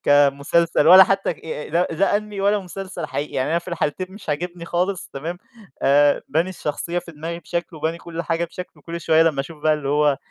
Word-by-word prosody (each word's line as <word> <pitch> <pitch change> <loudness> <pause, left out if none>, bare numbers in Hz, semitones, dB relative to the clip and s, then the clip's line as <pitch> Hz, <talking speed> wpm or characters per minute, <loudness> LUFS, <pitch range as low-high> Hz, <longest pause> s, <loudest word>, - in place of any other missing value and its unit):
كمسلسل 145 +3 +3
ولا 185 +3 +10
حتى 195 -1 0
ك - - -20
آآ، 155 -2 -6
لا، 175 +3 +2
لا 195 +5 +2
Anime 210 -1 -7
ولا 205 +1 +3
مسلسل 185 -3 -6
حقيقي، 145 0 -4
يعني 130 +2 -1
أنا 165 - +2
في 170 - -11
الحالتين 170 +2 -2
مش 205 - -13
عاجبني 170 +3 -3
خالص 180 +2 -1
تمام، 165 +6 -5 0.4
آآ 145 +1 +4
باني 160 +6 +1
الشخصية 170 0 -3
في 175 -1 -9
دماغي 165 +3 -6
بشكل 170 -1 -4
وباني 160 +2 -2
كل 170 0 -6
حاجة 165 0 -1
بشكل 180 +2 -9
وكل 170 0 -7
شوية 160 0 +4
لمّا 160 -4 +2
أشوف 150 +2 -9
بقى 155 0 +4
اللي 150 -2 -4
هو 145 0 +3
170 Hz, 210 wpm, -22 LUFS, 150-180 Hz, 0.4 s, ولا